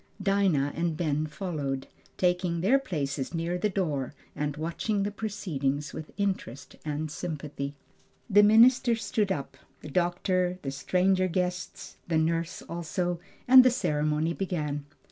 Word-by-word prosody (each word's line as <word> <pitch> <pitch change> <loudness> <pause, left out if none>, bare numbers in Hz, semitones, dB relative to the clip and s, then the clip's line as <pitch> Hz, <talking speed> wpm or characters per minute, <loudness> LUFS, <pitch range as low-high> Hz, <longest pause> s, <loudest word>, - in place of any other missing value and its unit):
Dinah 195 -8 +2
and 165 -1 -1
Ben 155 -2 0
followed, 150 -5 -3 0.3
taking 180 -2 +1
their 245 +10 +4
places 145 - -3
near 170 +2 -1
the 210 - +1
door 150 -9 -2 0.2
and 150 0 -2
watching 185 +6 -1
the 205 - -1
proceedings 160 -10 -2
with 155 - -7
interest 190 - -3
and 155 0 -3
sympathy. 150 -4 -5 0.5
The 205 -2 +6
minister 230 +3 +6
stood 210 -2 -1
up, 145 -7 -4 0.2
the - - -8
doctor, 180 +2 +1
the 135 - -2
stranger 185 +6 +2
guests, 180 0 -3
the 165 -2 +1
nurse 165 +1 0
also, 175 +1 -2 0.3
and 255 0 +10
the 255 - +6
ceremony 155 -7 0
began. 150 -6 -3
170 Hz, 135 wpm, -28 LUFS, 150-195 Hz, 0.5 s, and